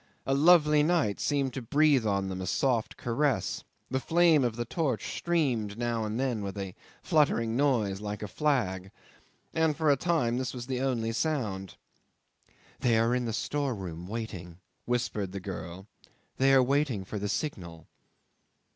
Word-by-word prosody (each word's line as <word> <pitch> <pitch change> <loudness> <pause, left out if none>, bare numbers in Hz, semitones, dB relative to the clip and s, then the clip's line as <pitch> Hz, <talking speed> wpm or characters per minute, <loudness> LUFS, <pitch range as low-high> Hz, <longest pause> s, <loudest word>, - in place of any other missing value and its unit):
A 135 - +1
lovely 150 0 +5
night 155 - +1
seemed 140 -3 0
to 135 - -4
breathe 140 -1 +3
on 100 -1 0
them 95 0 -4
a 95 - -4
soft 120 -1 0
caress. 120 -3 0 0.3
The 130 - +1
flame 165 -1 +4
of 120 -3 0
the 120 0 -3
torch 135 -3 -2
streamed 125 -12 0
now 120 -2 -1
and 110 +3 -3
then 125 -5 -1
with 100 0 -5
a 95 -2 -5 0.3
fluttering 115 -8 +2
noise 115 -8 +1
like 105 0 -5
a - - -3
flag, 95 -7 0 0.6
and 160 -2 +1
for 160 -2 +3
a - - +5
time 130 -6 0
this 130 0 -3
was 120 -1 -5
the 130 -1 -2
only 120 -4 0
sound. 110 - -2 1.0
"They 120 -2 +3
are 115 +2 +2
in 125 -1 0
the 115 - -2
storeroom 100 - -3
waiting," 95 -6 -6 0.3
whispered 105 -5 -2
the 100 - -4
girl; 95 -1 -7 0.5
"they 135 +1 +4
are 135 -1 +6
waiting 135 -6 0
for 105 +2 -5
the 105 +1 -3
signal." 85 - -4
120 Hz, 165 wpm, -29 LUFS, 100-140 Hz, 1.0 s, are